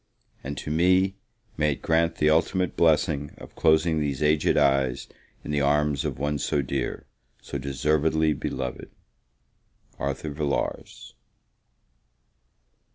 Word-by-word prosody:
And 70 +1 -5
to 75 - -5
me, 90 +4 +3 0.4
may 75 -1 +2
it - - -13
grant, 80 +1 +2
the 75 0 +2
ultimate 90 +3 +1
blessing 75 -3 +1
of - - -12
closing 80 0 +3
these 70 -2 -2
aged 75 0 +2
eyes 70 -3 +2 0.4
in - - -5
the 75 -1 +1
arms 75 0 +1
of 70 -4 -3
one 75 +2 -1
so 70 0 0
dear 60 - -3 0.3
so - - -6
deservedly 75 +3 +1
beloved! 65 -3 -5 1.1
ARTHUR 70 +2 -3
VILLARS. 70 -1 -3
75 Hz, 120 wpm, -25 LUFS, 70-80 Hz, 1.1 s, me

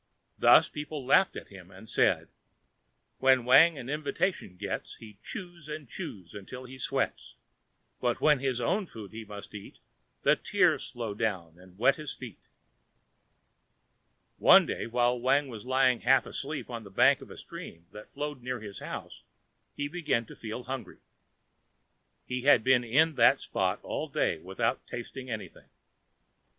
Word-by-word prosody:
Thus - - +7
people 150 -2 -6
laughed 130 - +4
at - - -8
him - - -13
and - - -14
said: - - +2 0.9
"When 130 -2 +4
Wang 150 +6 +7
an 130 - -7
invitation 150 - -2
gets, - - -5
He 105 -3 -14
chews 175 -4 -8
and 150 -2 -6
chews 95 -5 -8
until 105 +6 -9
he 130 +1 -11
sweats, - - -2 0.6
But, 120 -1 0
when 150 -3 +4
his 130 -2 -1
own 190 - 0
food 110 - -10
he 110 +1 -7
must 105 -1 -10
eat. 105 -2 -10 0.5
The - - +5
tears - - +1
flow - - -5
down 95 -6 -3
and 90 0 -17
wet 125 +6 +3
his 150 -3 -5
feet." 120 -7 -10 2.0
One - - +7
day - - -4
while 120 +1 +1
Wang 135 +3 +2
was 115 -1 -8
lying 130 -2 +3
half 130 +2 +4
asleep 145 +2 -5
on 115 -2 -5
the 100 - -11
bank 95 - +4
of - - -11
a - - -11
stream 85 +1 -10
that 105 0 -11
flowed 145 -3 -5
near 125 0 -4
his 105 -2 -8
house - - -7 0.5
he 145 - -2
began 150 -7 -1
to - - -12
feel 115 +2 -6
hungry. 120 -5 -6 1.3
He 125 0 -3
had 130 -6 +6
been 130 0 +4
in 155 +8 +3
that 135 - +6
spot 95 +1 -1
all 155 - -3
day 90 - 0
without 115 +9 -2
tasting 130 +2 -7
anything. 110 -3 -7
125 Hz, 160 wpm, -29 LUFS, 110-140 Hz, 2.0 s, Thus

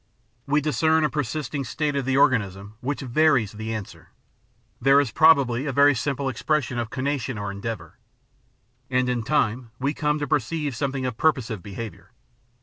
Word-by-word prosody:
We 145 +2 +2
discern 160 +2 +2
a 150 - +1
persisting 150 0 -3
state 145 +4 -2
of 140 -2 -1
the 135 0 +1
organism 100 -7 +1
which 140 +4 -3
varies 130 -4 +2
the 110 +1 -6
answers; 95 -7 -7 0.7
there 135 +3 +6
is 140 -6 0
probably 140 -5 +4
a 140 +1 +4
simple 140 +2 -2
expression 130 0 -1
of 115 -2 -3
conation 135 -2 -2
or 100 -1 -3
endeavour. 105 +3 -6 0.9
And 125 -1 +1
in 125 -1 0
time 115 +2 0
we 140 +4 -1
come 150 -1 0
to 145 -1 -3
perceive 150 0 -1
something 135 +1 -2
of 125 -3 -3
purposive 125 - 0
behaviour. 100 -2 -8
130 Hz, 155 wpm, -24 LUFS, 115-145 Hz, 0.9 s, there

